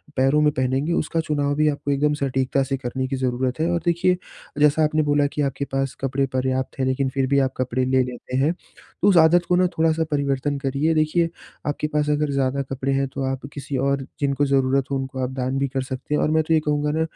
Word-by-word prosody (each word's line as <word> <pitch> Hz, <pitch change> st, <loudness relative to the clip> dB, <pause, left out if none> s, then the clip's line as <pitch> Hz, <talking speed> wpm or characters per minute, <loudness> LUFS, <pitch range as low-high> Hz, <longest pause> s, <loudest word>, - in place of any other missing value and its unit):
पैरों 135 Hz, +3 st, +3 dB
में 150 Hz, 0 st, +4 dB
पहनेंगे 130 Hz, +5 st, 0 dB
उसका 165 Hz, 0 st, -1 dB
चुनाव 145 Hz, -1 st, 0 dB
भी 155 Hz, +1 st, +2 dB
आपको 145 Hz, -1 st, -2 dB
एकदम 145 Hz, +2 st, +2 dB
सटीकता 135 Hz, 0 st, +1 dB
से 135 Hz, 0 st, -2 dB
करने 130 Hz, 0 st, -3 dB
की 135 Hz, -, -2 dB
ज़रूरत 130 Hz, +1 st, -1 dB
है। 165 Hz, +2 st, +1 dB
और 170 Hz, 0 st, 0 dB
देखिए, 175 Hz, +1 st, +2 dB, 0.4 s
जैसा 150 Hz, +1 st, +4 dB
आपने 155 Hz, 0 st, +2 dB
बोला 145 Hz, 0 st, +3 dB
कि 150 Hz, -, -1 dB
आपके 140 Hz, 0 st, -1 dB
पास 135 Hz, -1 st, 0 dB
कपड़े 135 Hz, 0 st, 0 dB
पर्याप्त 130 Hz, +1 st, -1 dB
है, 130 Hz, -, +1 dB
लेकिन 130 Hz, +1 st, 0 dB
फिर 135 Hz, 0 st, -1 dB
भी 140 Hz, +1 st, +3 dB
आप 130 Hz, -, -11 dB
कपड़े 130 Hz, 0 st, 0 dB
ले 130 Hz, 0 st, +3 dB
लेते 125 Hz, 0 st, -5 dB
हैं, 145 Hz, +5 st, +2 dB
तो 190 Hz, -, -6 dB
उस 195 Hz, -3 st, +5 dB
आदत 170 Hz, +2 st, +5 dB
को 180 Hz, -, +4 dB
ना 180 Hz, 0 st, +4 dB
थोड़ा-सा 160 Hz, 0 st, +2 dB
परिवर्तन 140 Hz, 0 st, 0 dB
करिए। 140 Hz, +3 st, 0 dB
देखिए, 155 Hz, +2 st, +2 dB, 0.4 s
आपके 145 Hz, +1 st, -1 dB
पास 150 Hz, 0 st, +1 dB
अगर 150 Hz, 0 st, +1 dB
ज़्यादा 140 Hz, 0 st, 0 dB
कपड़े 135 Hz, +1 st, -2 dB
हैं, 135 Hz, 0 st, +1 dB
तो 135 Hz, 0 st, -5 dB
आप 135 Hz, 0 st, -5 dB
किसी 140 Hz, -1 st, -4 dB
और 135 Hz, +1 st, 0 dB
जिनको 140 Hz, 0 st, +1 dB
ज़रूरत 135 Hz, -1 st, +1 dB
हो -, -, +1 dB
उनको 130 Hz, 0 st, -5 dB
आप 125 Hz, -, -1 dB
दान 130 Hz, 0 st, -2 dB
भी 140 Hz, -, +1 dB
कर 135 Hz, 0 st, -2 dB
सकते 130 Hz, +3 st, -4 dB
हैं -, -, +1 dB
और 155 Hz, -, +1 dB
मैं 160 Hz, 0 st, +3 dB
तो 160 Hz, -, 0 dB
ये 160 Hz, -, +5 dB
कहूँगा 150 Hz, 0 st, +1 dB
ना, 160 Hz, +2 st, -1 dB
140 Hz, 240 wpm, -23 LUFS, 130-150 Hz, 0.4 s, उस